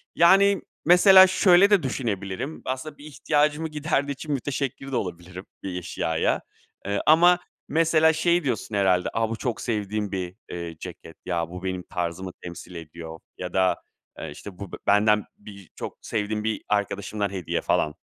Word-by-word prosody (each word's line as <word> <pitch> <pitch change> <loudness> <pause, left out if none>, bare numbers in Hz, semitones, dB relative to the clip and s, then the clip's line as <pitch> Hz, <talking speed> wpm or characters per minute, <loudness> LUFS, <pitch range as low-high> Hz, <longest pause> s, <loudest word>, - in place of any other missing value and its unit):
yani, 195 +3 +5 0.2
mesela 190 +3 +8
şöyle 185 +1 +5
de 200 -6 +4
düşünebilirim. 115 0 -3
Aslında 130 +3 -4
bir 145 - -13
ihtiyacımı 150 +1 0
giderdiği 150 -2 -1
için 150 +3 -7
müteşekkir 135 0 -3
de - - -2
olabilirim, 90 -3 -5 0.2
bir 90 -2 -4
eşyaya, 80 -2 -1 0.4
eee, 100 +1 -1
ama 175 +3 +6 0.3
mesela 160 0 +3
şey 170 +1 +2
diyorsun 110 -4 -2
herhâlde. 95 -3 +2
"A, 115 0 0
bu 115 - -2
çok 115 +1 -3
sevdiğim 105 -3 -2
bir, 90 -2 -4
eee, 85 -1 -6
ceket. 80 - -10
Ya 85 -2 -2
bu 90 +1 -8
benim 95 -1 -3
tarzımı 90 +1 -4
temsil 85 +1 -9
ediyor" 80 0 -9 0.2
ya 90 -1 -6
da, 95 -1 +2 0.4
eee, 80 - -6
işte, 90 +5 -11
"Bu 100 -3 -7 0.2
benden 105 +1 +4
birçok 100 -4 -10
sevdiğim 105 0 -2
bir 110 -1 -2
arkadaşımdan 100 0 -1
hediye" 95 -4 -3
falan. 75 - 0
105 Hz, 155 wpm, -25 LUFS, 90-150 Hz, 0.4 s, mesela